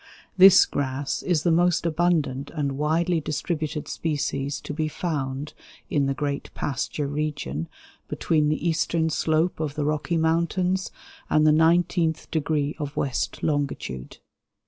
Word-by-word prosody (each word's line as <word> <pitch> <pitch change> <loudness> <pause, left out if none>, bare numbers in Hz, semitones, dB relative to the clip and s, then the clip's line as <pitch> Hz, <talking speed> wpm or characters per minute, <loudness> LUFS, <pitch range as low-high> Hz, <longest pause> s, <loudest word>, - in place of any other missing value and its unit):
This 190 0 +8
grass 140 0 -2
is 165 -4 0
the 170 - +3
most 175 0 +2
abundant 155 -5 0
and 145 -3 -1
widely 160 +4 +1
distributed 155 0 -3
species 145 -2 -2
to - - -6
be 155 +1 -1
found 145 -3 -3 0.4
in 140 -2 +2
the 135 - -1
great 140 0 -3
pasture 145 +2 -2
region 145 - -3 0.4
between 150 -2 +1
the 155 +2 -1
eastern 160 0 +1
slope 160 +3 +1
of 150 -3 -3
the 150 - -1
Rocky 155 +3 0
Mountains 170 +3 +1 0.4
and 155 0 +4
the 155 - +6
nineteenth 165 0 +2
degree 150 -2 0
of 145 -1 -5
west 135 -3 -2
longitude. 140 - -2
155 Hz, 135 wpm, -25 LUFS, 145-165 Hz, 0.4 s, This